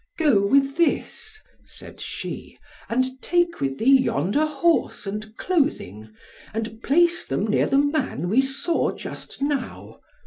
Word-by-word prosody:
"Go 245 -12 +3
with 275 +4 +2
this," 430 +5 -1 0.2
said - - -13
she, - - -6 0.3
"and 255 +2 -1
take 345 -1 0
with 135 -1 -1
thee 265 +3 +5
yonder 205 - +1
horse, 305 -5 0
and 215 +2 -6
clothing, 270 - -1 0.5
and 225 0 -4
place 345 +6 +3
them - - -2
near - - +2
the 275 - +2
man 285 - 0
we 225 +8 +4
saw 270 +5 -1
just - - -8
now. 285 -2 -3
270 Hz, 135 wpm, -23 LUFS, 220-310 Hz, 0.5 s, thee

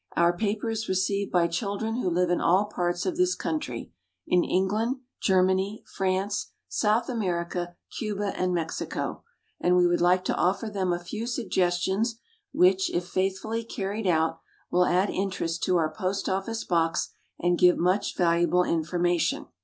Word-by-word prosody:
Our 170 +1 +3
paper 215 +3 -1
is 220 0 -3
received 195 +2 0
by 175 -2 +3
children 200 +6 -2
who 245 - 0
live 175 +1 +1
in 175 - +1
all 185 +4 +4
parts 175 -4 -2
of 350 -3 -1
this 365 0 +2
country, 310 -1 -4 0.3
in 180 -1 +3
England, 210 +7 +1 0.3
Germany, 190 +2 +2
France, 190 +1 -2
South 220 +2 +1
America, 175 -6 -2 0.2
Cuba, 205 -2 -2
and 185 0 0
Mexico; 165 -2 -3 0.4
and 180 0 +3
we 180 - +5
would 175 0 +2
like 180 +1 +3
to - - 0
offer 200 +5 0
them 190 -3 0
a 175 - +1
few 210 +6 -5
suggestions 205 -1 0 0.3
which, 190 +1 +4
if 175 0 -2
faithfully 195 +4 -1
carried 205 -1 -3
out, 160 -1 +2 0.3
will 180 0 +3
add 185 +3 +2
interest 185 -4 -2
to 180 - +3
our 155 -2 0
Post 190 +4 -2
office 195 +4 -2
Box, 165 -2 0 0.3
and 175 0 +1
give 180 -1 +6
much 185 +4 +1
valuable 175 +1 +3
information. 175 +1 0
185 Hz, 155 wpm, -27 LUFS, 175-205 Hz, 0.4 s, give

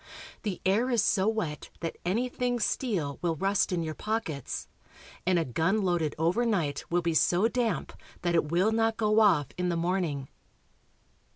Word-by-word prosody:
The 200 -5 -3
air 215 +7 +2
is 235 -5 +2
so 200 -2 +2
wet 200 -10 -2
that 165 -1 -4
anything 245 +5 0
steel 195 - -1
will 170 -1 0
rust 195 +5 +1
in 175 -2 0
your 155 -1 -3
pockets, 210 - -3 0.6
and 185 -1 +4
a 165 - +1
gun 175 - +1
loaded 175 -5 0
overnight 170 -3 +1
will 175 0 +1
be 170 0 +1
so 175 +6 +3
damp 230 -4 -1 0.3
that 175 -1 +1
it 165 -3 +2
will 185 +6 +3
not 225 0 +1
go 215 0 +3
off 175 - +4
in 180 0 +1
the 170 - 0
morning. 165 -6 -1
180 Hz, 165 wpm, -29 LUFS, 165-220 Hz, 0.6 s, and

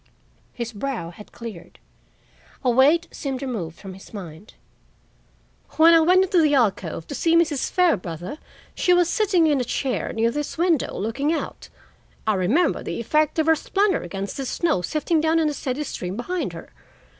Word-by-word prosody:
His 235 -1 -5
brow 220 -6 -4
had 210 +4 -14
cleared; 225 -7 -10 0.9
a 250 - +3
weight 295 +8 +4
seemed 270 -1 -4
removed 195 -11 -4
from 195 -2 -9
his 190 +3 -13
mind. 185 +1 -10 1.2
"When 325 +1 +6
I 330 - +7
went 365 +4 +5
into 370 -2 +3
the 300 -2 +3
alcove 195 - 0
to - - -7
see 330 +5 +2
Mrs. 325 -5 +2
Fairbrother, 185 - 0 0.3
she 360 - +3
was 355 -1 +3
sitting 370 -3 +2
in 290 -4 +2
a - - 0
chair 255 +1 -2
near 230 +1 +1
this 295 +4 -4
window 335 -4 +1
looking 235 +9 -1
out. 330 - -4 0.6
I 215 - +2
remember 215 - +1
the - - -5
effect 305 +7 +1
of 315 - +2
her 320 0 +5
splendor 395 +5 0
against 195 +3 -5
the 270 -2 -3
snow 325 - 0
sifting 310 - 0
down 320 +1 +2
in 320 -2 +2
a - - -3
steady 275 +1 -3
stream 185 -8 -5
behind 355 +9 -3
her. - - -10
275 Hz, 175 wpm, -23 LUFS, 210-330 Hz, 1.2 s, I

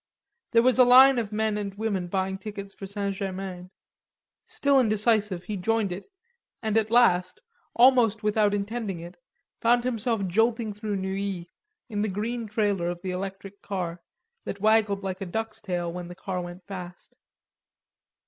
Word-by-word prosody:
There 230 -1 +4
was 255 +1 +3
a - - +10
line 255 +1 +8
of 220 -3 -3
men 215 0 0
and 200 -1 -5
women 200 -4 -2
buying 190 +1 -2
tickets 200 -1 -7
for 195 - -8
St. 200 0 -2
Germain; 190 -2 -5 0.8
still 280 -1 +2
indecisive, 215 -5 +1
he 205 +3 -4
joined 220 +1 0
it, 180 +3 -6 0.6
and 220 -1 -1
at 220 -1 +2
last, 185 -7 +3 0.4
almost 235 -4 +5
without 210 -1 +2
intending 205 -2 -3
it, 170 +2 -9 0.5
found 240 +1 +3
himself 230 -4 0
jolting 225 +3 +1
through 210 0 -4
Neuilly 190 -2 -3 0.4
in 210 -4 -3
the 215 - +1
green 225 +4 -3
trailer 205 -5 0
of 175 0 -6
the 185 - -2
electric 195 +1 -6
car, 180 -4 -4 0.4
that 200 - -5
waggled 215 -1 +3
like 190 0 -4
a - - -2
duck's 220 +3 -4
tail 175 -4 -3
when 180 0 -6
the 175 - -9
car 185 -1 -4
went 175 +1 -9
fast. 180 -3 -9
200 Hz, 160 wpm, -26 LUFS, 190-225 Hz, 0.8 s, a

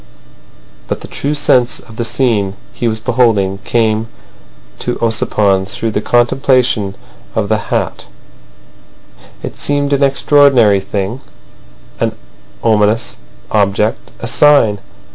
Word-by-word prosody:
But - - -3
the - - -9
true 145 +2 -3
sense 125 -4 +2
of 110 0 -15
the 120 - -1
scene 115 -5 0 0.2
he 120 - -2
was 110 -1 -1
beholding 110 -5 +1
came 110 0 0 0.7
to 125 - -2
Ossipon 100 -4 +1
through 110 +3 -3
the 105 - -1
contemplation 120 -4 +2 0.4
of 105 -2 -1
the 110 -1 +2
hat. - - -2 1.4
It - - -7
seemed 145 0 0
an 140 - +1
extraordinary 135 -6 +4
thing, 100 +5 -4 0.8
an - - 0 0.5
ominous 110 +1 +1 0.3
object, 105 +1 0
a 115 - -5
sign. 115 -6 +4
115 Hz, 115 wpm, -14 LUFS, 105-125 Hz, 1.4 s, extraordinary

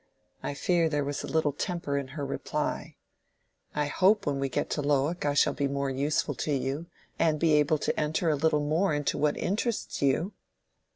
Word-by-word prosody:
I 145 - -3
fear 170 +2 +2
there 145 -2 0
was 140 0 -3
a - - -5
little 160 -2 +1
temper 170 -2 -2
in 140 -2 -1
her 145 - -2
reply. 135 - -3 0.8
"I 150 0 +1
hope 195 +7 +3
when 140 -2 0
we 135 0 -1
get - - -1
to 150 - 0
Lowick, 145 +4 +1
I 145 - +1
shall - - +4
be 140 - 0
more 140 0 -1
useful 145 +2 0
to 150 - -1
you, 140 +4 -1 0.3
and 155 -2 +2
be 160 -1 +3
able 150 +1 +4
to - - -1
enter 155 +3 0
a 155 - +3
little 150 0 +2
more 155 +3 +2
into 145 -1 -1
what 150 0 +2
interests 215 +3 -2
you." 145 +8 +1
150 Hz, 195 wpm, -28 LUFS, 140-160 Hz, 0.8 s, shall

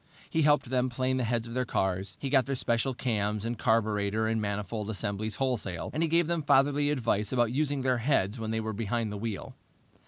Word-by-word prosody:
He 160 - +2
helped 145 -4 +3
them 130 0 +2
plane 130 +1 0
the 130 - 0
heads 115 0 0
of 115 - -8
their 130 +1 0
cars. 95 -4 -1
He 135 - -4
got 135 -3 +4
their 135 - -1
special 125 +1 0
cams 105 -3 -1
and 120 +1 -1
carburetor 110 -3 +1
and 110 0 0
manifold 105 +1 -3
assemblies 105 +1 -2
wholesale, 110 -10 -2
and 155 - -1
he 165 - +2
gave 170 +1 +3
them 170 0 0
fatherly 145 0 +3
advice 115 -7 0
about 120 -3 +2
using 145 0 0
their 130 -2 +2
heads 115 -4 +1
when 110 -1 -3
they 110 0 -1
were 110 0 -3
behind 110 +1 -1
the 105 - -4
wheel. 110 -2 -4
115 Hz, 215 wpm, -29 LUFS, 105-130 Hz, -, got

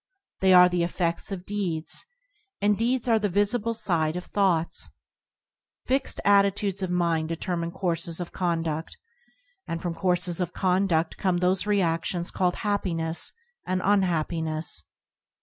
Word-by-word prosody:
They 190 0 +4
are 180 0 +8
the 180 -1 -1
efFedts 170 +1 -1
of 185 -2 -5
deeds, 180 -6 -2 0.5
and 205 +1 +3
deeds 245 +3 0
are 225 -2 +4
the 205 -1 0
visible 205 +4 0
side 165 -7 +2
of 180 - -5
thoughts. 180 -5 0 1.0
Fixed 265 +1 0
attitudes 200 -1 +3
of 185 - -2
mind 170 -3 0
deter 175 +2 -2
mine 170 0 -2
courses 170 -2 -1
of 175 - -5
conduct, 165 -3 -2 0.7
and 165 - -3
from 175 -1 -3
courses 180 0 0
of 180 0 -3
condu6l 180 -3 +1
come 185 -3 +1
those 180 +3 +1
reactions 175 -3 0
called 180 -1 0
hap 205 -1 -1
piness 165 -2 +1 0.3
and 185 0 -1
unhappiness. 160 - 0
180 Hz, 140 wpm, -26 LUFS, 165-200 Hz, 1.0 s, are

